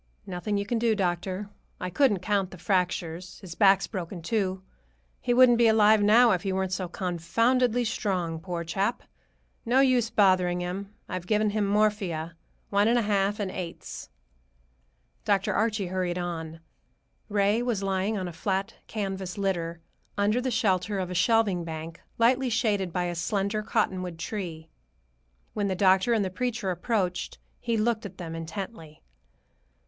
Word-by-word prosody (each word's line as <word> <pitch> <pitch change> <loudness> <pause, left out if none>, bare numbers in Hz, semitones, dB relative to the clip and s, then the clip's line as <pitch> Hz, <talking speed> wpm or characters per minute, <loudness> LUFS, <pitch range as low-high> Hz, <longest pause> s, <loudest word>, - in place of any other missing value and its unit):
"Nothing 195 +3 -2
you 200 - -1
can 230 +2 -1
do, 225 -1 +2
doctor. 185 +1 -2 0.3
I 180 - -4
couldn't 210 -4 +3
count 200 -2 0
the 185 - -11
fractures. 180 -1 -2
His 185 -4 -8
back's 195 +1 +4
broken, 175 -3 -6
too. 190 -2 -1 0.6
He 245 - -1
wouldn't 240 -1 +6
be 235 - +6
alive 220 -1 +5
now 225 +3 +6
if 180 - +1
he 195 - -2
weren't 190 0 -1
so 185 0 -2
confoundedly 230 +8 +1
strong, 180 -7 -1
poor 175 0 -4
chap. 195 +7 -1 0.6
No 245 +3 +3
use 255 -4 +3
bothering 185 -4 +3
him. 190 +3 -4 0.2
I've 185 -2 -5
given 215 -1 +2
him 210 -1 0
morphia, 200 -6 0 0.4
one 200 +1 +3
and 235 +1 +4
a 235 - +2
half, 205 0 +1
in 195 -2 -2
eighths." 175 - -7 1.1
Dr. 200 -2 +1
Archie 215 -2 0
hurried 180 -1 -1
on. 165 -2 -5 0.7
Ray 205 +2 +2
was 235 -5 -1
lying 195 +2 0
on 185 -2 -3
a 175 - -7
flat 190 +3 -2
canvas 195 -3 -4
litter, 170 -4 -2 0.4
under 210 +4 +2
the 255 - -1
shelter 205 -4 +1
of 185 -1 -3
a - - -2
shelving 195 -1 +2
bank, 160 0 -7 0.2
lightly 250 +3 +3
shaded 210 -6 0
by 180 +1 -1
a 175 0 -2
slender 200 +4 -1
cottonwood 185 -4 -1
tree. 165 -3 -5 0.8
When 205 -1 -1
the 190 - -1
doctor 190 +4 +4
and 215 -3 +2
the 185 - -3
preacher 220 -2 -2
approached, 180 0 -2 0.2
he 235 -2 -1
looked 220 0 +1
at 190 -1 -16
them 165 -2 -6
intently. 165 -1 -7
195 Hz, 160 wpm, -27 LUFS, 180-215 Hz, 1.1 s, wouldn't